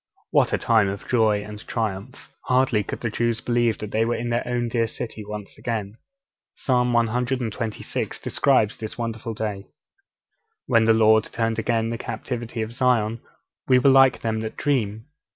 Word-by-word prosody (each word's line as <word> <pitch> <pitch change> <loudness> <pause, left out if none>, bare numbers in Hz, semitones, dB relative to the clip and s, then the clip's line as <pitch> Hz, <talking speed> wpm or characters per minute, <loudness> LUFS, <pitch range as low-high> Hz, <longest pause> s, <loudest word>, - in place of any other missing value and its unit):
What - - +3
a - - +2
time 110 -3 +3
of 100 +1 -6
joy 110 -4 +2
and 105 0 -9
triumph! 105 -4 -4
Hardly 125 -4 +2
could - - -6
the 120 - -2
Jews 115 0 0
believe 120 -2 +1
that 105 -1 -7
they 110 - +2
were 120 +1 0
in 120 +1 -3
their 120 - +1
own 120 -1 -1
dear 115 -1 0
city 110 -1 -6
once 105 -1 -8
again. 110 -3 -3 0.6
Psalm 125 -2 +1
cxxvi. 120 -1 -1
describes 130 -4 +2
this 110 -1 -6
wonderful 115 -1 -4
day. 105 -2 -4 1.0
'_When 115 -3 +4
the 115 - +6
Lord 110 0 +5
turned 115 -1 -1
again 115 0 0
the 115 - -4
captivity 115 0 -4
of 110 - -6
Zion, 115 -3 +1 0.5
we 130 - +6
were 135 +2 +5
like 135 -1 +5
them 110 -1 -1
that 110 0 -5
dream. 110 -7 -1
115 Hz, 170 wpm, -24 LUFS, 110-120 Hz, 1.0 s, the